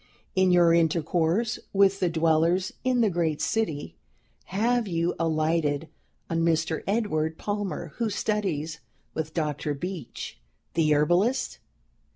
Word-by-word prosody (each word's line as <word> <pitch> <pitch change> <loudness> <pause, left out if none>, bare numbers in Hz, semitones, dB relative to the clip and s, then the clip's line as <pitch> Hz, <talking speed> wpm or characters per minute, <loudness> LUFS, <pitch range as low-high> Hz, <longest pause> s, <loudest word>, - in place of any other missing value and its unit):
"In 190 0 +4
your 175 -2 +5
intercourse 170 +5 +1
with 195 0 +4
the 180 - +2
dwellers 165 +3 +2
in 255 -1 +2
the 220 - +4
great 165 -3 0
city, 145 - -2 0.5
have 230 +4 +1
you 170 -1 0
alighted 160 -2 0 0.4
on 165 - -1
Mr. 165 -1 +1
Edward 160 -7 0
Palmer, 205 -4 -3
who 230 -2 0
studies 180 -8 -2 0.3
with 160 0 -4
Dr. 150 -2 -1
Beach, 165 - -6 0.3
the 160 -2 +2
Herbalist? 185 - +2
170 Hz, 120 wpm, -26 LUFS, 160-195 Hz, 0.5 s, your